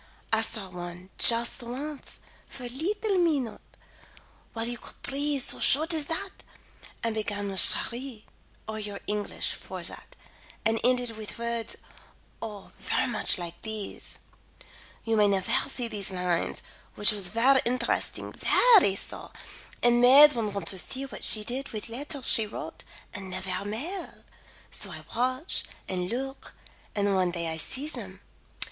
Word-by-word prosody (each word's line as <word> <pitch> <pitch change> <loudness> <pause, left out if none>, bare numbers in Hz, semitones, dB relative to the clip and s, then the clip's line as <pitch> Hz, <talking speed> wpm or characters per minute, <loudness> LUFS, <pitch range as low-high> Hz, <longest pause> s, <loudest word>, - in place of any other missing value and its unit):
I 220 - +4
saw 220 -3 -2
one, 180 +1 -8
just 235 +1 +5
once, 270 +5 -7 0.3
for 250 - -9
a 245 - -5
leetle 385 - -1
minute; 290 -10 0 0.9
while 225 0 -2
you 240 -1 -4
could - - -10
breathe 280 0 -1
so - - -1
short 315 +5 +4
as 305 -3 0
that; 380 +4 -4 0.6
and 230 -1 0
began 205 -2 -2
with 190 - +2
Cheri, 240 -2 +3 0.4
or 220 0 -4
your 205 -1 -5
English 210 0 -1
for - - -7
that, - - -7 0.5
and 225 0 +2
ended 250 -1 +2
with 215 -1 -7
words 235 -1 -3 0.6
Oh, 210 -3 -7
ver - - 0
much 240 -5 +3
like 170 -1 -6
these: 220 -2 -2 0.9
You 225 -1 0
may 210 -1 +5
nevaire 195 -2 +1
see 245 -2 -2
these 210 -4 -2
lines, 180 -2 -1 0.3
which 210 - +5
was 200 -3 +1
ver 250 +6 +4
interesting, 240 0 0
veree 410 - +6
so, - - -4 0.5
and 240 0 +5
made 280 +4 +9
one 225 -4 -2
want 200 0 -4
to 190 - -2
see 265 +8 -3
what 270 - -6
she 215 - +5
did 255 +5 -3
with 215 +1 -6
letters 275 +3 -3
she 220 -2 +6
wrote - - -8 0.3
and 195 -3 -6
nevaire 185 +1 -3
mail; 310 - -5 0.5
so - - 0
I - - -7
watch 255 +6 0 0.2
and 180 -1 -2
look, 270 +4 -5 0.4
and 200 -1 +1
one 185 -2 +2
day 170 -2 -3
I 160 - -3
see 265 - -1
them. 310 - -7
230 Hz, 155 wpm, -28 LUFS, 205-270 Hz, 0.9 s, made